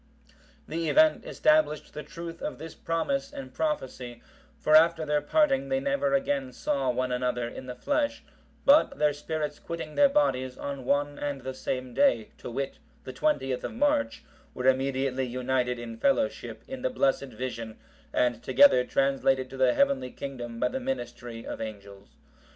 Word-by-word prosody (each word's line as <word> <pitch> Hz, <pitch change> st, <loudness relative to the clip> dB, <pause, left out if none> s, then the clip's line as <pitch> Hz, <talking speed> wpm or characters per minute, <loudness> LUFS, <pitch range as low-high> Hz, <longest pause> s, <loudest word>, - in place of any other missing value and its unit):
The 165 Hz, 0 st, -2 dB
event 315 Hz, +6 st, +4 dB
established 310 Hz, -, +2 dB
the 150 Hz, -, -5 dB
truth 165 Hz, +2 st, -8 dB
of -, -, -4 dB
this 160 Hz, +1 st, -8 dB
promise 150 Hz, -5 st, -2 dB
and 130 Hz, -1 st, -8 dB
prophecy, 130 Hz, -6 st, -3 dB, 0.4 s
for 155 Hz, -, +3 dB
after 165 Hz, 0 st, +5 dB
their 150 Hz, 0 st, +1 dB
parting, 275 Hz, -, +2 dB
they 265 Hz, 0 st, +1 dB
never 280 Hz, 0 st, +1 dB
again 275 Hz, -1 st, -1 dB
saw 135 Hz, -10 st, -1 dB
one 125 Hz, +1 st, 0 dB
another 125 Hz, -1 st, -1 dB
in 130 Hz, +2 st, -8 dB
the 125 Hz, -, -6 dB
flesh; 285 Hz, -, -1 dB, 0.4 s
but 285 Hz, +3 st, +5 dB
their 150 Hz, -1 st, +3 dB
spirits 150 Hz, 0 st, -4 dB
quitting 165 Hz, -2 st, -6 dB
their 285 Hz, -1 st, +5 dB
bodies 130 Hz, -, +1 dB
on 140 Hz, -2 st, -5 dB
one 145 Hz, +1 st, 0 dB
and 145 Hz, -2 st, -3 dB
the 130 Hz, +1 st, -5 dB
same 130 Hz, -1 st, -4 dB
day, 280 Hz, -1 st, +3 dB
to -, -, -7 dB
wit, -, -, -4 dB, 0.2 s
the -, -, -7 dB
20th 135 Hz, -, 0 dB
of -, -, -4 dB
March,(759) 285 Hz, +1 st, +1 dB, 0.3 s
were 125 Hz, -, -1 dB
immediately 130 Hz, 0 st, +1 dB
united 125 Hz, 0 st, -1 dB
in 115 Hz, -1 st, -7 dB
fellowship 275 Hz, 0 st, 0 dB
in 265 Hz, -1 st, -6 dB
the 260 Hz, -, 0 dB
blessed 140 Hz, -, +1 dB
vision, 115 Hz, -2 st, -6 dB, 0.3 s
and 120 Hz, -2 st, +1 dB
together 280 Hz, -, +6 dB
translated 135 Hz, 0 st, +1 dB
to 135 Hz, -, -8 dB
the 130 Hz, -1 st, +3 dB
heavenly 280 Hz, -, +2 dB
kingdom 120 Hz, -4 st, -7 dB
by -, -, +2 dB
the 265 Hz, -, -3 dB
ministry 120 Hz, -, -5 dB
of -, -, -6 dB
angels. 100 Hz, -6 st, -9 dB
140 Hz, 165 wpm, -28 LUFS, -, 0.4 s, together